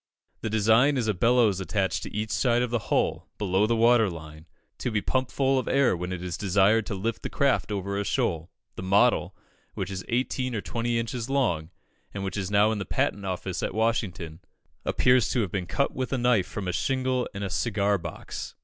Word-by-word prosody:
The 110 Hz, -, -2 dB
design 110 Hz, +6 st, +4 dB
is 120 Hz, -3 st, 0 dB
a 105 Hz, -, +2 dB
bellows 115 Hz, 0 st, +3 dB
attached 95 Hz, +1 st, -1 dB
to -, -, -7 dB
each 110 Hz, +1 st, -3 dB
side 120 Hz, -1 st, +2 dB
of 125 Hz, -, -3 dB
the 120 Hz, -, +1 dB
hull, -, -, 0 dB
below 100 Hz, 0 st, +1 dB
the 115 Hz, -, +2 dB
water 115 Hz, -2 st, +4 dB
line, 80 Hz, -1 st, -10 dB, 0.3 s
to -, -, -1 dB
be 110 Hz, -2 st, 0 dB
pumped 130 Hz, +4 st, -1 dB
full 135 Hz, -1 st, +2 dB
of -, -, -5 dB
air 135 Hz, -7 st, +3 dB
when 90 Hz, +1 st, -4 dB
it 90 Hz, -1 st, -4 dB
is 90 Hz, -2 st, -4 dB
desired 100 Hz, +3 st, +3 dB
to 100 Hz, -, -3 dB
lift 110 Hz, +4 st, -3 dB
the -, -, -4 dB
craft 140 Hz, -5 st, +1 dB
over 100 Hz, 0 st, -2 dB
a -, -, 0 dB
shoal. 85 Hz, -3 st, -1 dB, 0.3 s
The -, -, -4 dB
model, 95 Hz, +2 st, +2 dB, 0.4 s
which 95 Hz, 0 st, -4 dB
is 95 Hz, -1 st, -5 dB
eighteen 125 Hz, +1 st, -1 dB
or 105 Hz, -, -2 dB
twenty 115 Hz, +7 st, -2 dB
inches 115 Hz, +1 st, -3 dB
long, 100 Hz, -, 0 dB, 0.5 s
and 100 Hz, -, -3 dB
which 95 Hz, -, -3 dB
is 100 Hz, -2 st, -2 dB
now 105 Hz, +1 st, +4 dB
in 110 Hz, -, -2 dB
the -, -, -2 dB
Patent 100 Hz, +1 st, -1 dB
Office 95 Hz, 0 st, -3 dB
at -, -, -3 dB
Washington, 95 Hz, -8 st, -1 dB, 0.5 s
appears 125 Hz, -2 st, +3 dB
to 125 Hz, -, +1 dB
have 100 Hz, -5 st, -2 dB
been 95 Hz, -3 st, -3 dB
cut 140 Hz, +11 st, 0 dB
with 130 Hz, -1 st, -3 dB
a 135 Hz, -, +1 dB
knife 120 Hz, -6 st, +2 dB
from 95 Hz, -1 st, -5 dB
a 90 Hz, -, -1 dB
shingle 130 Hz, +5 st, 0 dB
and 100 Hz, -, -4 dB
a 100 Hz, -, -2 dB
cigar 100 Hz, 0 st, +1 dB
box. -, -, -7 dB
105 Hz, 215 wpm, -26 LUFS, 95-120 Hz, 0.5 s, design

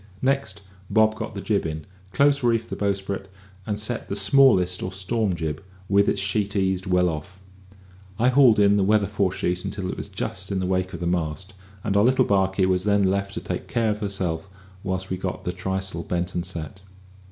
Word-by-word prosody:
Next, 130 Hz, -7 st, 0 dB, 0.3 s
Bob 110 Hz, -1 st, +4 dB
got -, -, -6 dB
the -, -, -4 dB
jib -, -, 0 dB
in, 80 Hz, -1 st, -5 dB, 0.3 s
close 140 Hz, 0 st, +3 dB
reefed 115 Hz, -1 st, +1 dB
the -, -, -2 dB
bowsprit, 100 Hz, -1 st, -2 dB, 0.4 s
and 105 Hz, -1 st, -1 dB
set 110 Hz, +2 st, -2 dB
the 100 Hz, -, -2 dB
smallest 100 Hz, -4 st, +4 dB
or 95 Hz, -, -3 dB
storm 95 Hz, +1 st, -1 dB
jib, 80 Hz, -1 st, -4 dB, 0.2 s
with 100 Hz, +1 st, +3 dB
its 100 Hz, -, 0 dB
sheet 100 Hz, +1 st, -1 dB
eased 95 Hz, -1 st, 0 dB
well 90 Hz, -1 st, +3 dB
off. 85 Hz, +3 st, -5 dB, 0.8 s
I 120 Hz, +3 st, +3 dB
hauled 125 Hz, -4 st, +6 dB
in 100 Hz, 0 st, +5 dB
the 100 Hz, -, +3 dB
weather 105 Hz, +1 st, +3 dB
fore 100 Hz, -1 st, 0 dB
sheet 90 Hz, -1 st, -2 dB
until 95 Hz, -2 st, -3 dB
it -, -, -7 dB
was -, -, -5 dB
just 95 Hz, 0 st, -4 dB
in 95 Hz, -, 0 dB
the 95 Hz, -, -1 dB
wake 95 Hz, 0 st, -1 dB
of 85 Hz, -, -6 dB
the -, -, -2 dB
mast, 85 Hz, +2 st, -2 dB, 0.3 s
and 100 Hz, -2 st, -1 dB
our 100 Hz, -, +5 dB
little 130 Hz, +3 st, +4 dB
barkie 95 Hz, -1 st, +2 dB
was 90 Hz, 0 st, +1 dB
then 100 Hz, 0 st, +3 dB
left 100 Hz, 0 st, -2 dB
to -, -, -4 dB
take -, -, -5 dB
care 115 Hz, -2 st, +1 dB
of 105 Hz, -, -3 dB
herself 95 Hz, -4 st, -2 dB, 0.3 s
whilst 95 Hz, 0 st, -3 dB
we 95 Hz, -, -1 dB
got 90 Hz, 0 st, -4 dB
the 90 Hz, -, -3 dB
trysail 95 Hz, -1 st, -3 dB
bent 90 Hz, +1 st, -2 dB
and 85 Hz, 0 st, -2 dB
set. 85 Hz, +1 st, -6 dB
95 Hz, 210 wpm, -24 LUFS, 90-105 Hz, 0.8 s, hauled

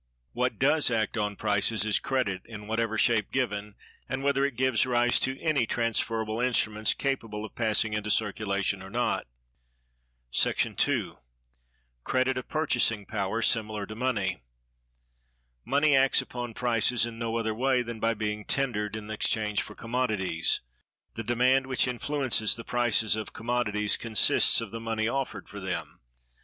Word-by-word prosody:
What 125 Hz, +1 st, -1 dB
does 145 Hz, +2 st, +3 dB
act 110 Hz, -2 st, 0 dB
on 105 Hz, -2 st, -1 dB
prices 105 Hz, 0 st, +1 dB
is 110 Hz, -, +2 dB
Credit, 125 Hz, -9 st, -1 dB
in 105 Hz, -2 st, -9 dB
whatever 110 Hz, +1 st, -1 dB
shape 110 Hz, -2 st, +2 dB
given, 105 Hz, -5 st, -2 dB, 0.3 s
and 130 Hz, +1 st, -3 dB
whether 140 Hz, -1 st, +2 dB
it 140 Hz, -3 st, 0 dB
gives 130 Hz, 0 st, +2 dB
rise 120 Hz, 0 st, +3 dB
to 135 Hz, +1 st, -1 dB
any 150 Hz, -8 st, +1 dB
transferable 115 Hz, -1 st, -1 dB
instruments 110 Hz, -4 st, +1 dB
capable 115 Hz, -6 st, -3 dB
of 110 Hz, -, -11 dB
passing 110 Hz, -1 st, +1 dB
into 105 Hz, 0 st, -2 dB
circulation 100 Hz, -2 st, 0 dB
or 95 Hz, -, -9 dB
not. 120 Hz, -, -1 dB, 1.1 s
§ -, -, +2 dB
2. -, -, 0 dB, 0.9 s
Credit 130 Hz, +1 st, +1 dB
a 125 Hz, -, -2 dB
purchasing 125 Hz, -8 st, +1 dB
Power, 105 Hz, +2 st, -2 dB
similar 110 Hz, -3 st, +1 dB
to 110 Hz, -, -8 dB
Money. 105 Hz, -, -1 dB, 1.2 s
Money 145 Hz, -, +3 dB
acts 135 Hz, 0 st, +4 dB
upon 120 Hz, -2 st, -5 dB
prices 120 Hz, 0 st, +2 dB
in 115 Hz, -1 st, -7 dB
no 115 Hz, 0 st, -2 dB
other 110 Hz, -1 st, -1 dB
way 125 Hz, +2 st, +1 dB
than 115 Hz, -1 st, -6 dB
by 115 Hz, +1 st, +1 dB
being 105 Hz, 0 st, -3 dB
tendered 110 Hz, -5 st, -1 dB
in 110 Hz, 0 st, -7 dB
exchange 105 Hz, -1 st, 0 dB
for -, -, -9 dB
commodities. 110 Hz, -8 st, -1 dB, 0.5 s
The 115 Hz, -, -5 dB
demand 125 Hz, +3 st, +2 dB
which 130 Hz, -1 st, +1 dB
influences 125 Hz, -3 st, 0 dB
the 115 Hz, -, -7 dB
prices 120 Hz, -3 st, +1 dB
of 110 Hz, -2 st, -6 dB
commodities 110 Hz, -3 st, 0 dB
consists 115 Hz, 0 st, +3 dB
of 115 Hz, -4 st, -6 dB
the 115 Hz, -, -5 dB
money 115 Hz, -1 st, -1 dB
offered 135 Hz, +2 st, -3 dB
for -, -, -9 dB
them. -, -, -5 dB
115 Hz, 150 wpm, -28 LUFS, 105-125 Hz, 1.2 s, acts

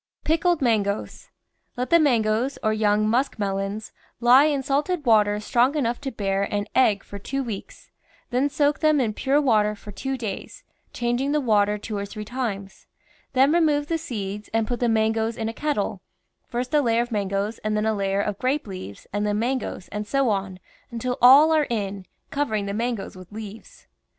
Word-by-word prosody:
PICKLED 330 Hz, 0 st, +1 dB
MANGOES 210 Hz, -4 st, -1 dB, 0.5 s
Let 250 Hz, 0 st, -3 dB
the 335 Hz, -, +7 dB
mangoes, 240 Hz, -2 st, +1 dB
or 215 Hz, -1 st, +2 dB
young 215 Hz, 0 st, +2 dB
musk 250 Hz, +6 st, +1 dB
melons, 195 Hz, +1 st, -3 dB, 0.3 s
lie 250 Hz, +4 st, +6 dB
in 285 Hz, -3 st, 0 dB
salted 295 Hz, +4 st, -1 dB
water 210 Hz, -3 st, +4 dB
strong 245 Hz, +6 st, +2 dB
enough 245 Hz, -4 st, -1 dB
to 275 Hz, -2 st, -4 dB
bear 195 Hz, -3 st, -1 dB
an 205 Hz, 0 st, -1 dB
egg 210 Hz, -6 st, +3 dB
for 200 Hz, -, -9 dB
two 270 Hz, +7 st, -3 dB
weeks, 220 Hz, -6 st, -8 dB, 0.4 s
then 260 Hz, +4 st, +1 dB
soak 290 Hz, 0 st, +1 dB
them 310 Hz, -2 st, +3 dB
in 225 Hz, -5 st, 0 dB
pure 275 Hz, +6 st, +1 dB
water 215 Hz, -7 st, +2 dB
for 205 Hz, 0 st, -11 dB
two 270 Hz, +6 st, -4 dB
days, 215 Hz, -6 st, -6 dB, 0.3 s
changing 245 Hz, +4 st, -1 dB
the 300 Hz, -, +2 dB
water 210 Hz, -5 st, +2 dB
two 210 Hz, +1 st, -6 dB
or 200 Hz, 0 st, -3 dB
three 210 Hz, +1 st, -7 dB
times; 210 Hz, -5 st, -5 dB, 0.5 s
then 270 Hz, +2 st, +4 dB
re 340 Hz, -, +4 dB
move 295 Hz, -3 st, +2 dB
the 330 Hz, -1 st, 0 dB
seeds 210 Hz, -5 st, -5 dB
and 225 Hz, -1 st, +2 dB
put 245 Hz, -, -2 dB
the 240 Hz, -, +1 dB
mangoes 220 Hz, 0 st, +1 dB
in 220 Hz, -, -2 dB
a -, -, -5 dB
kettle, 230 Hz, -9 st, -2 dB, 0.5 s
first 250 Hz, +3 st, -4 dB
a 300 Hz, -, +5 dB
layer 235 Hz, -2 st, +2 dB
of 240 Hz, -, -10 dB
mangoes 200 Hz, +1 st, -2 dB
and 215 Hz, 0 st, -1 dB
then 210 Hz, -, 0 dB
a 220 Hz, -, +2 dB
layer 195 Hz, -1 st, 0 dB
of 205 Hz, -1 st, -3 dB
grape 275 Hz, +4 st, 0 dB
leaves 185 Hz, -, -8 dB
and 205 Hz, 0 st, 0 dB
then 205 Hz, 0 st, 0 dB
mangoes, 240 Hz, -5 st, -2 dB
and 210 Hz, 0 st, -5 dB
so 275 Hz, +1 st, +1 dB
on, 195 Hz, -2 st, -2 dB, 0.3 s
until 245 Hz, +1 st, -3 dB
all 275 Hz, +6 st, +8 dB
are 310 Hz, -2 st, +3 dB
in, 200 Hz, -4 st, -3 dB, 0.2 s
covering 220 Hz, -8 st, -1 dB
the 200 Hz, -, -3 dB
mangoes 230 Hz, -2 st, -3 dB
with 185 Hz, 0 st, -13 dB
leaves. 215 Hz, 0 st, -10 dB
225 Hz, 190 wpm, -24 LUFS, 205-270 Hz, 0.5 s, all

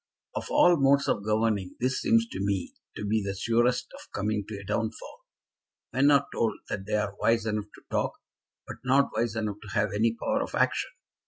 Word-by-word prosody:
"Of -, -, -4 dB
all 175 Hz, -1 st, +5 dB
modes 140 Hz, 0 st, +4 dB
of 100 Hz, -, 0 dB
governing 105 Hz, -3 st, 0 dB
this 130 Hz, +1 st, 0 dB
seems 115 Hz, 0 st, +3 dB
to 95 Hz, -, -6 dB
me 100 Hz, -3 st, -1 dB, 0.2 s
to 105 Hz, -, -4 dB
be 110 Hz, +1 st, +1 dB
the 100 Hz, 0 st, -3 dB
surest 120 Hz, +5 st, +2 dB
of -, -, -13 dB
coming 105 Hz, +1 st, -1 dB
to 105 Hz, -, -6 dB
a -, -, -9 dB
downfall. 110 Hz, +2 st, -4 dB, 0.7 s
Men 135 Hz, +2 st, +4 dB
are 140 Hz, -1 st, +5 dB
told 115 Hz, -1 st, +1 dB
that 95 Hz, 0 st, -4 dB
they 105 Hz, -, 0 dB
are 105 Hz, -2 st, 0 dB
wise 115 Hz, -1 st, +2 dB
enough 105 Hz, -1 st, -1 dB
to -, -, -17 dB
talk, -, -, 0 dB, 0.5 s
but -, -, -8 dB
not 135 Hz, +2 st, +3 dB
wise 115 Hz, 0 st, 0 dB
enough 105 Hz, -2 st, -2 dB
to 105 Hz, +1 st, -9 dB
have 105 Hz, -1 st, +2 dB
any 110 Hz, +2 st, +2 dB
power -, -, 0 dB
of -, -, -4 dB
action. -, -, +1 dB
110 Hz, 200 wpm, -28 LUFS, 105-120 Hz, 0.7 s, all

